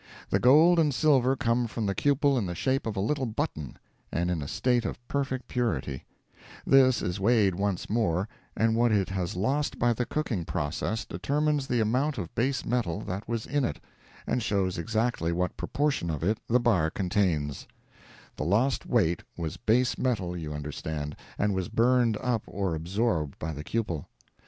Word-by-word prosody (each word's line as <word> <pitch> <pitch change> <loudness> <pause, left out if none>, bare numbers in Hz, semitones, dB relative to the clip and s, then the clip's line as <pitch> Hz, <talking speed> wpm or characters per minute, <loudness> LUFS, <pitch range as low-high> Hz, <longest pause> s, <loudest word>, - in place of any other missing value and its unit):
The - - +3
gold 160 +7 +6
and 155 -3 +3
silver 135 -2 +3
come 120 -1 +1
from 115 -1 -3
the 100 - 0
cupel 140 +3 +2
in 115 -7 0
the 90 - -4
shape 130 +5 0
of 110 -2 -3
a - - +1
little 130 +6 0
button, 110 - -4 0.3
and 85 +2 0
in 85 -3 -1
a 70 - -5
state 125 - +1
of - - -3
perfect 135 -3 -2
purity; 75 - -2 0.6
this 130 -2 +5
is 90 +2 -2
weighed 105 -2 +3
once 100 0 -2
more, 100 -4 +1 0.3
and 110 0 +3
what 120 0 +3
it 100 -3 +2
has 95 0 -2
lost 135 +10 0
by 120 0 +3
the 120 +1 -2
cooking 125 - -2
process, 80 +8 -2
determines 150 -1 0
the 120 -2 +1
amount 130 +7 +1
of 85 - -5
base 130 +4 0
metal 110 -6 -1
that 100 +1 -5
was 115 -2 -2
in 145 -1 0
it, 80 - -2 0.5
and 125 - 0
shows 95 -4 0
exactly 110 -2 0
what 90 +1 -1
proportion 145 - -1
of 75 -1 -3
it 105 +5 +1
the 125 +2 +3
bar 105 -10 +2
contains—the 85 -6 -1 0.8
lost 110 - +1
weight 90 -8 +2 0.2
was 80 -3 -4
base 120 +2 +2
metal 100 -9 0
you 80 -3 -5
understand, 75 0 -4 0.2
and 105 0 +1
was 95 -2 -2
burned 120 -2 +3
up 120 -3 0
or 95 -3 -2
absorbed 85 - -1
by 80 +1 -4
the 75 +1 -6
cupel. 90 -7 -2
110 Hz, 175 wpm, -28 LUFS, 90-125 Hz, 0.8 s, gold